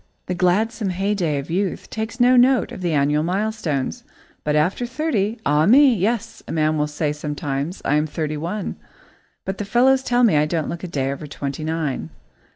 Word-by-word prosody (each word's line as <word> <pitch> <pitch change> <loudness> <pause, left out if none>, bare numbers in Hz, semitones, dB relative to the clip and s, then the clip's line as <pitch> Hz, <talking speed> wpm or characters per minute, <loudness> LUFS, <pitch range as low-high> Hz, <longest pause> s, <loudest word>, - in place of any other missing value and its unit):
The 180 - -2
gladsome 195 +4 +1
heyday 185 -4 0
of 140 +3 -5
youth 190 +2 -1
takes 220 +3 -4
no 250 +1 +5
note 255 +1 +4
of - - -8
the 175 -2 0
annual 145 +1 +2
milestones. 180 -5 -2 0.4
But 150 0 0
after 180 +11 +1
thirty, 235 -6 -1
ah 150 +3 +3
me! 270 +4 +7
"Yes," 225 +2 -1
a - - -6
man 155 -1 +1
will 150 0 0
say 150 0 -2
sometimes, 150 +2 -4
"I - - +2
am 150 +1 +1
thirty 155 0 -3
one, 175 +7 -4 0.7
but 190 0 -4
the - - -1
fellows 255 +6 +3
tell 245 -1 +1
me 210 -10 +5
I 150 +1 +3
don't 160 -1 -1
look 170 +1 -6
a - - -3
day 135 -5 -1
over 140 +2 -6
twenty 140 +1 -5
nine." 155 - -2
175 Hz, 190 wpm, -21 LUFS, 150-220 Hz, 0.7 s, me